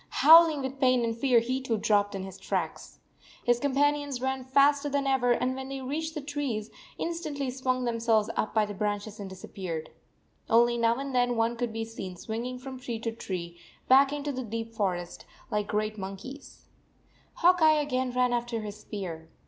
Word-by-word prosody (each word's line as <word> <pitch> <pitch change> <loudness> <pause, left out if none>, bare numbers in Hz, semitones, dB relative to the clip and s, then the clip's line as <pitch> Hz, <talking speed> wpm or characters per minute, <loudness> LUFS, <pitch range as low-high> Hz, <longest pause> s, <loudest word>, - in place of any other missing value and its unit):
Howl 330 +2 +8
ing 295 -3 -3
with 265 +1 -5
pain 255 -2 +3
and 230 0 -1
fear, 245 0 +4
he 255 +3 -2
too 235 -4 -1
dropped 205 -1 +2
in 190 - -4
his 190 0 -9
tracks. - - -4 0.5
His 240 0 +3
companions 285 0 +1
ran 265 0 -2
faster 280 +2 +3
than 280 0 0
ever, 265 -2 +2
and 250 +2 +1
when 265 0 -6
they 275 0 -4
reached 315 +5 -3
the 300 - -3
trees, 280 -7 -3 0.3
in - - -2
stantly 290 -6 -3
swung 255 -1 -1
themselves 230 -2 +2
up 215 - -1
by 215 -1 +2
the 205 - -6
branches 205 +1 -3
and 200 -1 -6
disappeared. 185 -4 -6 0.6
Only 235 +1 +5
now 230 0 +2
and 275 +1 -5
then 245 -1 +2
one 230 +1 +1
could 240 -1 -2
be 225 0 -3
seen 195 -5 -7
swinging 230 +7 -5
from 260 0 -8
tree 240 -2 -4
to 225 +1 -3
tree, 175 -6 -6 0.3
back 270 +1 +6
into 290 0 -3
the 260 -1 -4
deep 230 0 -5
forest, 180 -5 -3 0.3
like 210 -1 0
great 215 0 -2
mon 190 0 -4
95 - - -9
I - - -16
keys. 275 +2 -11 0.7
Hawk 355 0 +4
Eye 310 -1 +6
again 260 -3 -1
ran 250 0 +1
after 240 -1 -2
his 210 0 -7
spear. 175 -7 -7
240 Hz, 200 wpm, -28 LUFS, 215-270 Hz, 0.7 s, Howl